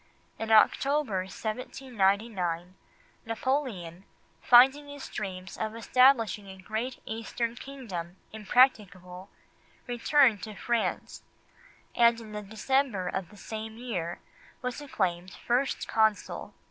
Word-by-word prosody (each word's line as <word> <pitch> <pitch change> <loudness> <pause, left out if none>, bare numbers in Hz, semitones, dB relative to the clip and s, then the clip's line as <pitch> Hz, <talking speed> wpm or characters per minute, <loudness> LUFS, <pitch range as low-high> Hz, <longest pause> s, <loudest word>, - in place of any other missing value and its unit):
In 225 - -4
October 265 0 +4
1799, 200 -6 -2 0.5
Napoleon, 225 - -2 0.4
finding 270 +4 +6
his 285 -1 -8
dreams 190 -2 -6
of 220 0 -3
establishing 230 -3 +3
a 190 0 -10
great 220 +7 -4
Eastern 230 +1 -3
kingdom 215 -11 -7 0.2
impracticable, 200 -5 +1 0.6
returned 245 -2 +3
to 215 -2 -7
France, 235 +2 -2 0.7
and 235 -1 +4
in 220 -2 -11
the 210 0 -5
December 220 -1 0
of 185 -2 -4
the 210 - -16
same 220 +1 -7
year 180 -9 -4 0.5
was 250 +3 -3
acclaimed 185 -9 -2
First 250 +3 0
Consul. 220 -2 0
220 Hz, 105 wpm, -28 LUFS, 190-250 Hz, 0.7 s, finding